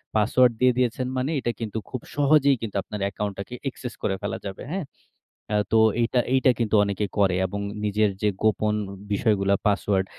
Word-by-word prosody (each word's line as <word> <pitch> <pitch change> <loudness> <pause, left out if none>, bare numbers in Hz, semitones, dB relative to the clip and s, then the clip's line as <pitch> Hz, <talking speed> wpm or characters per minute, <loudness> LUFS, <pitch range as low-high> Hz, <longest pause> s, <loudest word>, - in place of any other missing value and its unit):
Password 120 +4 +4
দিয়ে 125 -1 +4
দিয়েছেন 125 0 0
মানে 130 +4 -1
এটা 120 - -1
কিন্তু 110 -1 -4
খুব 130 - -5
সহজেই 140 -1 +4
কিন্তু 110 -3 -5
আপনার 105 - -7
অ্যাকাউন্টটাকে 100 +3 -4
access 125 -2 -8
করে 95 - +1
ফেলা 100 - -3
যাবে। 95 -1 -6
হ্যাঁ। 185 -4 -2 0.6
অ্যা 105 - +1
তো 110 - +4 0.2
এইটা, 120 +2 +2
এইটা 130 0 +5
কিন্তু 110 -2 +1
অনেকে 100 0 -1
করে। 95 -3 +3
এবং 100 +2 -4 0.3
নিজের 105 +1 +2
যে, 105 - +3
গোপন 110 -1 +2 0.4
বিষয়গুলা 100 -1 +2
পাসওয়ার্ড 100 -1 +1
110 Hz, 170 wpm, -25 LUFS, 100-125 Hz, 0.6 s, এইটা